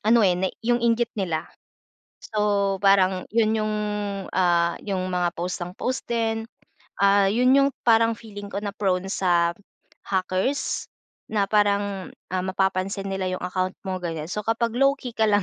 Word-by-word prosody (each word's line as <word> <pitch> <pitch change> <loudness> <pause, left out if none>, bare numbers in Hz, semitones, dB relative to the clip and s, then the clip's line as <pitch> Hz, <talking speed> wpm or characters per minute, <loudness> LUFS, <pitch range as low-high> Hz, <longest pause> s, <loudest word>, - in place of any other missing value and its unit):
ano, 230 +1 +6
eh, 180 -2 +4
na 190 +1 +1 0.2
yung 240 0 +2
inggit 235 0 +2
nila. 170 -5 -2 0.7
So, 205 -2 +1
parang 190 -2 +3
yun 220 -1 +2
yung, 215 0 -1 0.6
ah, 170 -2 +2
'yung 190 -3 -2
mga 180 -1 +1
post 180 +2 -3
ng 180 - -9
post 255 +1 -3
din. 225 -1 -1 0.5
Ah, 200 0 +5
'yun 250 +4 +3
'yung 275 0 +5 0.2
parang 230 0 +5
feeling 205 -3 -9
ko 200 - -2
na 205 - -2
prone 190 -2 0
sa 175 -3 +2 0.6
hackers, 190 +7 -1 0.4
na 210 -2 +1
parang, 200 -2 +1 0.2
ah, 185 0 -1
mapapansin 190 +1 -1
nila 190 -1 -2
'yung 185 - -4
account 185 +1 -2
mo, 185 -1 -2
ganyan. 165 -2 -4
So 210 +2 -3
kapag 230 +1 0
low-key 275 -1 +2
ka 220 - +3
lang 205 -1 +3
200 Hz, 160 wpm, -24 LUFS, 185-225 Hz, 0.7 s, ano